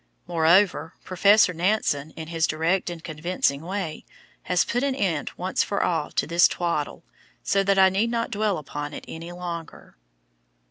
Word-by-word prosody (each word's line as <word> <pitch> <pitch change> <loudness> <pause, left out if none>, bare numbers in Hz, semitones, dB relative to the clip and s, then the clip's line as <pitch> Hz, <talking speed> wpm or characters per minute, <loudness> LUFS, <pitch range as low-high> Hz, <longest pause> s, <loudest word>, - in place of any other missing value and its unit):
Moreover, 170 +1 +3
Professor 200 +1 +4
Nansen, 170 -5 0
in 160 -1 -7
his 165 -1 +1
direct 165 +4 0
and 170 -2 -8
convincing 155 -3 -1
way, 175 -2 -4 0.5
has 180 -1 +3
put 245 - -1
an 275 -1 0
end 180 - -1
once 185 +1 -1
for 200 - 0
all 160 -4 0
to - - +1
this 170 +2 +5
twaddle, 170 -4 -3 0.4
so 195 - +2
that 195 0 +2
I 190 0 +7
need 200 +5 0
not 230 0 -2
dwell 210 -2 0
upon 145 0 -6
it - - -8
any 165 +2 -8
longer. 175 -2 -7
175 Hz, 165 wpm, -25 LUFS, 160-195 Hz, 0.5 s, I